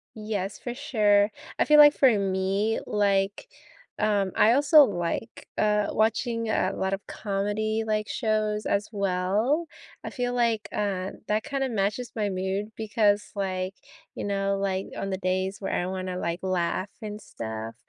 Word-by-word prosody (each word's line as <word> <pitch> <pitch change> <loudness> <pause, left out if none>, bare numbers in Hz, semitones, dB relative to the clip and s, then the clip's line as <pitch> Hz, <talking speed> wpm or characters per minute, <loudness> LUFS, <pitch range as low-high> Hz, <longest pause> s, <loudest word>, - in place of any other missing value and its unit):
Yes, 210 -3 -3
for 245 - -5
sure, 210 -6 +2 0.3
I - - +4
feel 300 - +6
like 295 0 +9
for 270 - +5
me, 195 +2 0
like, 200 - +1 0.5
um, 205 -3 +1
I 225 - +5
also 290 +3 +7
like, 185 +3 -4
uh, 210 -1 +2
watching 230 +1 0
a 190 -3 +1
lot 190 0 -1
of 195 0 -4
comedy, 210 +2 -2
like, 215 -1 -1
shows 215 -2 0
as 200 +1 0
well, 200 - 0 0.4
I - - -4
feel 245 -2 -2
like, 230 -3 +1
uh, 195 -2 -2 0.2
that 210 +1 0
kinda 270 -2 -2
matches 210 +3 -1
my 210 -2 0
mood 190 +3 -2
because, 210 -1 +1
like, 190 -1 -2 0.4
you - - -5
know, 200 0 0
like, 195 -1 -1
on 195 - -3
the 190 - -1
days 185 +1 -2
where 195 - -3
I 175 - 0
wanna, 185 0 -4
like, 170 -1 -2
laugh 185 +1 -1
and 210 -1 -6
stuff, 110 - -6
205 Hz, 160 wpm, -26 LUFS, 190-220 Hz, 0.5 s, like